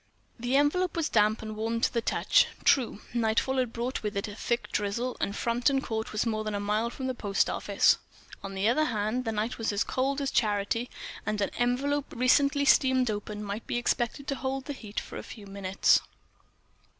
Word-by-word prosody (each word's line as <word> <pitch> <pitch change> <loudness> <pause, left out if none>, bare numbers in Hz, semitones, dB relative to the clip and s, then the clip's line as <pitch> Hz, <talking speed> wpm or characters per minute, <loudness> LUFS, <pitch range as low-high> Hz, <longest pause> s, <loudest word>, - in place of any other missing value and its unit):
The 245 +3 0
envelope 320 +6 +2
was 330 -2 0
damp 215 0 +2
and 215 0 -5
warm 225 +2 -1
to - - +2
the 235 - +1
touch. - - +3 0.2
True: 260 -7 +3
nightfall 235 +3 +1
had 250 -3 +1
brought 240 +3 -3
with 210 -2 -3
it 200 - -2
a 205 - -7
thick 235 +3 -2
drizzle, 220 +5 -1
and 200 - -1
Frampton 245 +4 +1
Court 220 -4 -3
was 215 - 0
more 215 -2 -1
than 215 -1 -3
a - - -1
mile 210 +3 0
from 260 +2 -6
the 260 - -1
post 200 -5 0
office. - - +3 0.4
On 195 0 -6
the 195 +2 +1
other 305 +7 +3
hand, 225 0 -1
the 225 - 0
night 220 +3 -2
was 225 - 0
as 205 0 +1
cold 270 +2 -1
as 275 -1 -1
charity; 215 +1 0 0.3
and 215 0 -2
an 200 - 0
envelope 275 +4 0
recently 280 +3 +3
steamed 260 -3 +4
open 210 0 -5
might 205 +2 -5
be - - -1
expected 240 +3 -1
to 275 - 0
hold 265 0 -3
the 290 - -4
heat 215 -6 -5
for - - -8
a - - -5
few 210 -3 -10
minutes. 195 -1 +2
230 Hz, 205 wpm, -28 LUFS, 210-260 Hz, 0.4 s, steamed